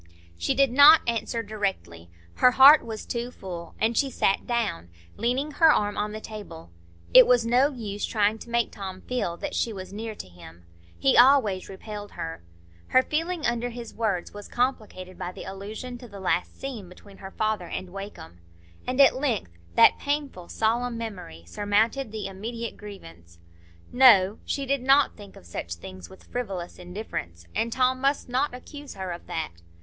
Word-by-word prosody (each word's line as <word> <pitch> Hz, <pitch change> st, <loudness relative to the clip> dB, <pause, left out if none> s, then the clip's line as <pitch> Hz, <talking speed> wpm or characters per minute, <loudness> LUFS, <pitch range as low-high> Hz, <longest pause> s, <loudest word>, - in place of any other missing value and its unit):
She 270 Hz, -, -1 dB
did 275 Hz, -1 st, +3 dB
not 290 Hz, +4 st, +8 dB
answer 230 Hz, 0 st, -1 dB
directly; 190 Hz, -, -4 dB, 0.3 s
her 250 Hz, -, +6 dB
heart 280 Hz, +4 st, +9 dB
was 220 Hz, -2 st, -7 dB
too 240 Hz, 0 st, -3 dB
full, 175 Hz, -7 st, -9 dB
and 225 Hz, +2 st, +1 dB
she 275 Hz, -, +2 dB
sat 195 Hz, -5 st, 0 dB
down, 225 Hz, -, -2 dB, 0.3 s
leaning 260 Hz, +6 st, -1 dB
her 320 Hz, +2 st, +5 dB
arm 205 Hz, -6 st, +1 dB
on 210 Hz, 0 st, -2 dB
the 215 Hz, -, -6 dB
table. 205 Hz, -, -10 dB, 0.4 s
It 255 Hz, -1 st, +9 dB
was 245 Hz, -2 st, +4 dB
no 250 Hz, +4 st, +4 dB
use 210 Hz, -6 st, -6 dB
trying 215 Hz, -1 st, +1 dB
to 235 Hz, -, -11 dB
make 235 Hz, -1 st, 0 dB
Tom 190 Hz, -2 st, -7 dB
feel 210 Hz, -9 st, -3 dB
that 290 Hz, +7 st, -5 dB
she 235 Hz, -, 0 dB
was 190 Hz, -2 st, -8 dB
near 220 Hz, +1 st, -5 dB
to -, -, -9 dB
him. 85 Hz, -1 st, -15 dB, 0.3 s
He 135 Hz, +10 st, +3 dB
always 240 Hz, -7 st, +5 dB
repelled 205 Hz, +1 st, -8 dB
her. 80 Hz, +1 st, -6 dB, 0.5 s
Her 255 Hz, -, +4 dB
feeling 330 Hz, +3 st, -2 dB
under 240 Hz, 0 st, 0 dB
his 235 Hz, -1 st, -8 dB
words 210 Hz, -6 st, -2 dB
was 205 Hz, 0 st, -9 dB
complicated 215 Hz, -7 st, -3 dB
by 180 Hz, -1 st, -4 dB
the -, -, -9 dB
allusion 215 Hz, +6 st, -7 dB
to 245 Hz, -, -11 dB
the 200 Hz, -3 st, -11 dB
last 180 Hz, -1 st, -1 dB
scene 235 Hz, -9 st, -6 dB
between 195 Hz, +2 st, -15 dB
her 190 Hz, -, -9 dB
father 215 Hz, -3 st, -2 dB
and 180 Hz, +1 st, -6 dB
Wakem; 195 Hz, -, -9 dB, 0.5 s
and 255 Hz, +2 st, -2 dB
at 275 Hz, -2 st, +7 dB
length 245 Hz, -, -1 dB, 0.2 s
that -, -, +6 dB
painful, 285 Hz, -11 st, -3 dB
solemn 235 Hz, +2 st, 0 dB
memory 185 Hz, -, -7 dB
surmounted 210 Hz, -, 0 dB
the 215 Hz, -2 st, -5 dB
immediate 230 Hz, +4 st, -5 dB
grievance. 85 Hz, -, -12 dB, 0.6 s
No! 220 Hz, -6 st, +6 dB
She 275 Hz, -, -2 dB
did 275 Hz, 0 st, 0 dB
not 275 Hz, +2 st, +4 dB
think 205 Hz, -2 st, -13 dB
of -, -, -15 dB
such 85 Hz, 0 st, -5 dB
things 90 Hz, 0 st, -11 dB
with -, -, -15 dB
frivolous 195 Hz, -9 st, -5 dB
indifference, 175 Hz, -, -7 dB
and 230 Hz, +1 st, -1 dB
Tom 255 Hz, +1 st, +1 dB
must 275 Hz, +1 st, +1 dB
not 255 Hz, +1 st, 0 dB
accuse 290 Hz, +3 st, -10 dB
her 190 Hz, -2 st, -5 dB
of 175 Hz, -, -8 dB
that. 160 Hz, -1 st, -3 dB
215 Hz, 175 wpm, -26 LUFS, 185-250 Hz, 0.6 s, heart